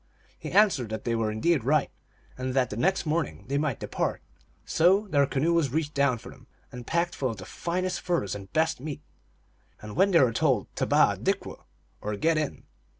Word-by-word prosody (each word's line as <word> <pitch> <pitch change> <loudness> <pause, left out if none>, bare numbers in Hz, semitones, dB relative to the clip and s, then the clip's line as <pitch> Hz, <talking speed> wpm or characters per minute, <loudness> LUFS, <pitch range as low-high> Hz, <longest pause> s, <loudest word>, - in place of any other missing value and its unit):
He - - -6
answered 185 - +3
that 110 -1 -5
they 120 - -1
were 115 -2 0
indeed 135 +6 +1
right, 145 +3 +2 0.4
and 130 0 -4
that 125 -4 +2
the - - -4
next 190 - +1
morning 150 - -2
they 140 +1 +1
might 145 -7 -1
depart. - - -2 0.4
So 190 +6 +3
their 140 -4 +3
canoe 150 +6 +1
was 165 -5 +2
reached 150 +2 -2
down 140 -3 +2
for - - -11
them, - - -17 0.2
and 125 -1 -9
packed 170 +1 0
full 130 - -1
of 115 - -5
the 95 - -9
finest 180 - -3
furs 170 - -1
and 100 -1 -8
best 160 +2 +1
meat, 150 +1 -6 0.8
when 105 - +1
they 175 -4 +5
were 125 -4 +4
told 130 -5 0
to - - 0
tebaJi - - +4
dikw, - - -2 0.4
or 105 0 -3
get 160 +8 +2
in. 150 -3 -4
140 Hz, 200 wpm, -27 LUFS, 115-165 Hz, 0.8 s, they